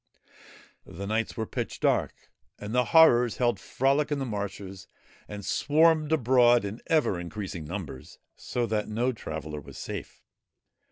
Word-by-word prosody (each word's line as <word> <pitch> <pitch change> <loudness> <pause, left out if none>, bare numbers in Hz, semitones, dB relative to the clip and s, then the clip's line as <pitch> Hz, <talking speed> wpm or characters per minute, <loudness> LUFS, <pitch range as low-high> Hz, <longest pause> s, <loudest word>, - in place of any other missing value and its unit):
The 100 +4 -7
nights 110 +2 -2
were 110 - -1
pitch - - -5
dark, - - -1 0.3
and 105 +2 -7
the 125 0 +3
Horrors 125 -8 +5
held 120 -5 +1
frolic 140 +8 0
in 145 - +1
the 135 - -2
marshes 100 -3 -6 0.4
and 105 -1 -8
swarmed 155 0 +3
abroad 120 -5 +4
in 105 +4 -6
ever 125 - +2
increasing 90 -2 -6
numbers, 80 -6 -7 0.2
so 120 -1 -2
that 105 -2 -1
no 120 +4 0
traveller 80 - -6
was 70 0 -12
safe. - - -7
110 Hz, 145 wpm, -27 LUFS, 100-130 Hz, 0.4 s, Horrors